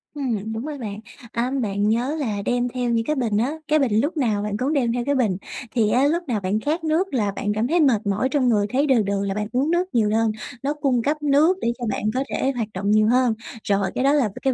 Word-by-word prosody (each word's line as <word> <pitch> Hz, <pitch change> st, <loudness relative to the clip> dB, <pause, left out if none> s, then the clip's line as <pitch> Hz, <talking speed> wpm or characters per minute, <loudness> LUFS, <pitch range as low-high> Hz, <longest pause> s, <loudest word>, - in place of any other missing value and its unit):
Ừm, 225 Hz, -7 st, -2 dB
đúng 225 Hz, +4 st, -4 dB
rồi 300 Hz, -1 st, -5 dB
bạn. 210 Hz, -5 st, -6 dB, 0.3 s
À, 240 Hz, +2 st, -1 dB
bạn 205 Hz, 0 st, 0 dB
nhớ 245 Hz, +7 st, 0 dB
là 215 Hz, -8 st, -2 dB
đem 245 Hz, 0 st, +1 dB
theo 245 Hz, 0 st, -2 dB
những 230 Hz, -1 st, +1 dB
cái 305 Hz, -, 0 dB
bình 230 Hz, -6 st, 0 dB
á, 250 Hz, +7 st, 0 dB
cái 310 Hz, 0 st, +3 dB
bình, 225 Hz, -6 st, +2 dB
lúc 310 Hz, +5 st, -2 dB
nào 220 Hz, -7 st, +1 dB
bạn 210 Hz, -1 st, -2 dB
cũng 270 Hz, +7 st, 0 dB
đem 240 Hz, -5 st, +1 dB
theo 245 Hz, 0 st, -1 dB
cái 285 Hz, +1 st, +1 dB
bình, 215 Hz, -9 st, +1 dB, 0.3 s
thì 220 Hz, -3 st, +2 dB
á 255 Hz, +4 st, +3 dB
lúc 340 Hz, +4 st, 0 dB
nào 230 Hz, -5 st, 0 dB
bạn 195 Hz, +2 st, -1 dB
khát 315 Hz, +7 st, -2 dB
nước 325 Hz, +4 st, 0 dB
là 210 Hz, -6 st, +1 dB
bạn 205 Hz, +1 st, -2 dB
cảm 215 Hz, +3 st, 0 dB
thấy 340 Hz, +5 st, +2 dB
mệt 235 Hz, -9 st, +3 dB
mỏi 205 Hz, +6 st, +1 dB
trong 260 Hz, -3 st, +2 dB
người, 205 Hz, -3 st, +2 dB
thấy 275 Hz, +6 st, +1 dB
đừ 255 Hz, -4 st, +4 dB
đừ 200 Hz, 0 st, -1 dB
là 195 Hz, -, -1 dB
bạn 210 Hz, +1 st, -3 dB
uống 270 Hz, +5 st, +1 dB
nước 355 Hz, +2 st, +1 dB
nhiều 215 Hz, -3 st, +3 dB
đơn, 225 Hz, 0 st, +2 dB, 0.3 s
nó 285 Hz, +2 st, 0 dB
cung 275 Hz, -5 st, 0 dB
cấp 300 Hz, +3 st, -1 dB
nước 295 Hz, +6 st, +4 dB
để 235 Hz, -, +1 dB
cho 240 Hz, -, -3 dB
bạn 210 Hz, -, -3 dB
có 260 Hz, +2 st, 0 dB
thể 270 Hz, -, 0 dB
hoạt 230 Hz, -3 st, -2 dB
động 200 Hz, +2 st, -1 dB
nhiều 215 Hz, 0 st, +4 dB
hơn. 250 Hz, 0 st, +3 dB, 0.3 s
Rồi, 200 Hz, -1 st, 0 dB
cái 255 Hz, -, 0 dB
đó 275 Hz, +1 st, +4 dB
là 275 Hz, -7 st, +2 dB
cái 265 Hz, -, +1 dB
245 Hz, 275 wpm, -23 LUFS, 210-280 Hz, 0.3 s, đừ